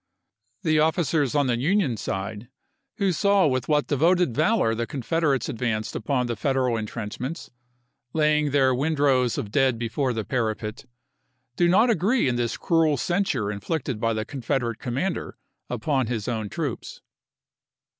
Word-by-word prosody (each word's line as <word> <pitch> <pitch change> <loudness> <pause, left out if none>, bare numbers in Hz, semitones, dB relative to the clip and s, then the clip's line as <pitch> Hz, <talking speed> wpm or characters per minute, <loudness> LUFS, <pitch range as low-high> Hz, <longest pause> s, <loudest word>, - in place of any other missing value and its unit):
The 155 -1 +3
officers 155 -3 +1
on 145 -1 +3
the 120 -2 0
Union 165 - +1
side, 105 +3 -5 0.5
who 200 -4 +2
saw 200 +2 +3
with 130 -4 0
what 150 -1 +2
devoted 165 0 +2
valor 155 - +2
the 115 +1 -2
Confederates 140 +1 0
advanced 110 -2 -2
upon 125 +2 0
the 120 -1 -2
Federal 130 0 0
intrenchments, 115 - -5 0.6
laying 150 -1 +2
their 135 -2 +3
windrows 135 -3 +2
of 100 - -4
dead 130 -1 +2
before 120 +4 -1
the 110 -3 -3
parapet, 110 -2 -3 0.7
do 175 - +3
not 220 +7 +4
agree 215 - +2
in 125 - +1
this 120 -1 -1
cruel 160 -3 +2
censure 175 - 0
inflicted 125 +4 -3
by 115 +1 +1
the 110 0 -2
Confederate 120 -3 -2
commander 135 +10 -3 0.3
upon 130 +1 0
his 110 -3 -3
own 110 -4 -2
troops. - - -5
130 Hz, 145 wpm, -25 LUFS, 115-155 Hz, 0.7 s, not